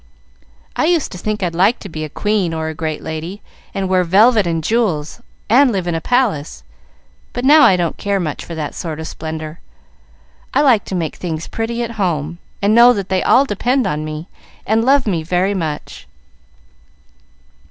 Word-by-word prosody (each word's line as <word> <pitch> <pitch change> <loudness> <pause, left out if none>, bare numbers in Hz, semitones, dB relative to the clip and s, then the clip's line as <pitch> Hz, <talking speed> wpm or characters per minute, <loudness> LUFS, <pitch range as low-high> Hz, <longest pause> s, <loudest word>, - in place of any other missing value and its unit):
"I - - +1
used 335 -2 +1
to - - -7
think 215 +1 -3
I'd 175 -2 -1
like 195 +8 +3
to - - -7
be 155 -3 -6
a 155 - -5
queen 200 -1 -1
or 160 0 -2
a - - -5
great 155 -1 -4
lady, 160 +5 -6 0.3
and 195 -1 -2
wear 185 -1 +2
velvet 205 +3 +4
and 165 -1 -1
jewels, 200 -4 -1 0.3
and 255 +4 +5
live 190 -4 -2
in 175 - -1
a 165 - -2
palace, 225 - 0 0.7
but 245 - -3
now 300 +3 +7
I 190 - +6
don't 175 -2 -1
care 200 -1 -1
much 155 -5 -3
for 170 - -8
that 155 -2 -4
sort 160 -3 -5
of 160 - -5
splendor. 160 0 -6 1.0
I - - +5
like 240 -7 +4
to 190 - -4
make 165 -4 -3
things 160 -3 -4
pretty 230 +1 -3
at 235 - -4
home, 170 -2 -1 0.2
and 205 +2 +3
know 240 +2 +7
that 200 -4 -4
they 190 -1 +1
all 270 - +4
depend 250 +3 0
on 150 0 -2
me, 155 +2 -6 0.4
and 220 +2 +2
love 275 +2 +3
me 180 -7 0
very 180 +4 0
much. 160 -6 -5
185 Hz, 190 wpm, -18 LUFS, 160-225 Hz, 1.0 s, now